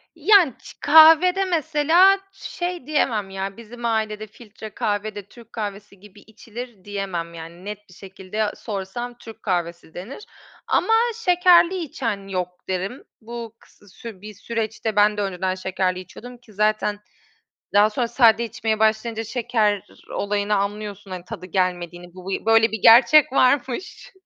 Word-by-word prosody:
Yani 340 - +5
ç - - -13
kahvede 325 +5 +6
mesela 335 +3 +3
şey 350 -6 -6
diyemem 225 -10 0
ya 195 +2 -5
bizim 235 +1 -9
ailede 215 -1 -2
filtre 215 0 -12
kahve 210 -2 -2
de 205 - -6
Türk 235 -2 -17
kahvesi 205 -2 -7
gibi 205 0 -17
içilir 225 -1 -11
diyemem 190 -5 -4
yani 170 +3 -11
net 210 -1 -8
bir - - -16
şekilde 195 +3 -5
sorsam 230 +4 -6
Türk 225 -2 -13
kahvesi 175 -3 -3
denir 235 - -9 0.4
ama 450 - +2 0.2
şekerli 360 -3 +4
içen 230 - -4
yok 180 -1 -5
derim. 190 +7 -3 0.2
Bu 230 0 -8
kıs 205 -2 -22
sür 220 -5 -10
bir 210 0 -9
süreçte 220 0 -4
ben 210 0 +3
de - - -1
önceden 185 -1 -2
şekerli 185 -1 -2
içiyordum 245 +7 -11
ki 235 -3 -20
zaten 210 0 0 0.7
daha 205 +2 +5
sonra 235 +2 -2
sade 235 -1 +4
içmeye 220 -1 -2
başlayınca 220 +1 0
şeker 220 -4 -1 0.3
olayını 205 +1 -1
anlıyorsun 205 0 -4
hani 180 -1 -7
tadı 185 0 -8
gelmediğini. 175 -1 -3
Bu 185 +1 -10
bir 195 - -3
böyle 225 0 +4
bir 220 - -2
gerçek 260 +4 +7
varmış 260 +4 0
215 Hz, 145 wpm, -22 LUFS, 195-240 Hz, 0.7 s, gerçek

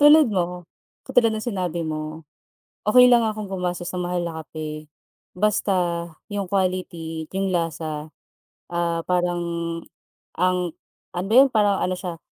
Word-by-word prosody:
tulad 295 -5 +7
mo, 180 -1 -1 0.4
katulad 235 -2 +4
ng 215 - -4
sinabi 180 -7 -2
mo, 155 0 -4 0.6
okey 250 +3 +7
lang 235 -2 +5
akong 215 -2 -3
gumastos 180 -2 -2
ng 180 -1 -2
mahal 180 0 -1
na 165 -2 -4
kape, 155 -1 -6 0.5
basta 180 -4 +1 0.2
yung 200 -2 -2
quality, 175 -4 -2
at - - -43
yung 195 0 0
lasa, 160 -3 -2 0.7
ah, 170 -1 0
parang 175 -1 +1 1.0
ang 180 +1 +3 0.5
ano 180 +3 -4
yun? 270 +2 +8
Parang 205 -4 +2
ano 185 0 0
siya 180 -3 -6
180 Hz, 135 wpm, -24 LUFS, 170-200 Hz, 1.0 s, yun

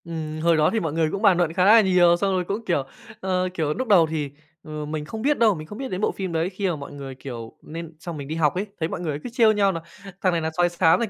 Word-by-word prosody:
Ừm, 155 -2 -5
hồi 165 0 +3
đó 155 0 +4
thì 225 - +2
mọi 160 -6 -2
người 160 -1 +1
cũng 200 - -3
bàn 200 -5 +5
luận 170 -2 +1
khá 180 +1 +2
là 220 +3 +8
nhiều, 180 -3 +4
xong 195 +2 0
rồi 185 -1 +1
cũng, 205 +5 -4
kiểu, 170 -8 +1 0.4
ờ, 185 -1 0
kiểu, 155 -4 -1
núc 260 - -3
đầu 180 -7 +6
thì, 155 -2 -3 0.3
ờ, 155 -1 -6
mình 150 0 -4
không 220 +7 -6
biết 290 +4 +2
đâu, 220 -4 +4
mình 155 -1 -8
không 205 - -9
biết 265 +1 -5
đến 185 +1 -3
bộ - - +2
phim 190 -2 -4
đấy 165 +2 0
khi 195 +1 -2
mà 170 - -1
mọi 140 -2 -8
người, 140 -2 -8
kiểu 120 -4 -8
nên 165 +1 -8
xong 165 -1 -6
mình 140 -2 -7
đi 155 - -4
học 155 -1 +2
ấy, 195 +3 -2
thấy 160 0 -1
mọi - - -4
người 150 -4 -3
cứ - - -5
trêu 230 -3 +5
nhau 200 -2 +3
nà 165 -3 -4 0.4
"Thằng 185 - +3
này 170 - 0
là 160 - -1
sói 175 0 +3
xám, 170 -1 +3
thằng 235 -3 -1
170 Hz, 310 wpm, -24 LUFS, 155-195 Hz, 0.4 s, là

